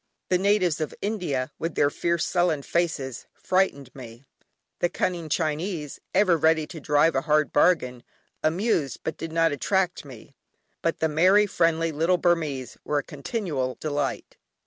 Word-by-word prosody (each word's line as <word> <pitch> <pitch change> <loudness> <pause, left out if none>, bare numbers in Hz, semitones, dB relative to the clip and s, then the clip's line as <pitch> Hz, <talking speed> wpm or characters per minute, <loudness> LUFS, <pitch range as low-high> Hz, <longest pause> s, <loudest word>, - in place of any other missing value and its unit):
The 180 - +3
natives 190 -5 +2
of 155 - -3
India, 175 -11 -2
with 165 0 -3
their 145 - +3
fierce 170 +1 0
sullen 175 -5 +1
faces, 145 -8 -2
frightened 160 -9 0
me; 120 0 -11 0.5
the 175 - +1
cunning 170 -3 -2
Chinese, 155 0 -2 0.2
ever 185 -5 +4
ready 160 0 +3
to 160 - -9
drive 150 +2 +3
a 135 - +1
hard 155 0 +1
bargain, 125 -7 +2 0.4
amused 165 - 0
but 160 - -3
did 165 - -6
not 165 0 +2
attract 185 +5 0
me; 135 -1 -13 0.5
but 165 - -1
the 160 - +3
merry, 185 +7 +4
friendly 165 -4 +1
little 165 +4 +2
Burmese 155 -8 -1
were 150 - -1
a 145 - 0
continual 145 - -3
delight. 145 -1 -3
160 Hz, 150 wpm, -25 LUFS, 145-175 Hz, 0.5 s, ever